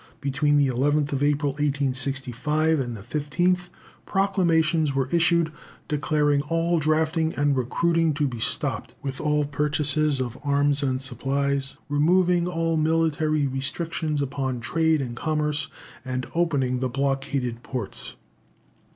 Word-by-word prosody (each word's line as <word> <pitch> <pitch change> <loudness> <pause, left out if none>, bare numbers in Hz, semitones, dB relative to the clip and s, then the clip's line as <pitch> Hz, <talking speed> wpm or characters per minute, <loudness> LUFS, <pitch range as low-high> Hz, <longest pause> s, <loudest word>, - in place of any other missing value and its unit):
Between 145 +1 +1
the 145 - +4
11th 145 +3 +1
April, 145 0 +2
1865, 140 +2 0
and 120 -3 -3
the 100 - -11
15th, 175 - 0 0.4
proclamations 165 -6 +2
were 135 -1 +1
issued, 170 -1 +3 0.4
declaring 150 -1 +1
all 165 +2 0
drafting 160 +1 +1
and 145 -1 +2
recruiting 165 +6 +1
to 145 -1 +1
be 120 -3 -5
stopped, - - -1
with 135 -1 -4
all 150 -1 +1
purchases 150 0 0
of 125 -2 -4
arms 145 0 +2
and 130 -2 0
supplies, 135 +1 -1
removing 175 +4 +3
all 165 -2 0
military 155 -1 +1
restrictions 145 +3 -2
upon 135 -2 -2
trade 160 +6 +1
and 120 -3 -4
commerce, 150 0 -1 0.4
and 130 -1 -3
opening 140 -7 +1
the 130 0 -1
blockaded 135 -2 -1
ports. 125 -5 -5
145 Hz, 125 wpm, -25 LUFS, 135-160 Hz, 0.4 s, the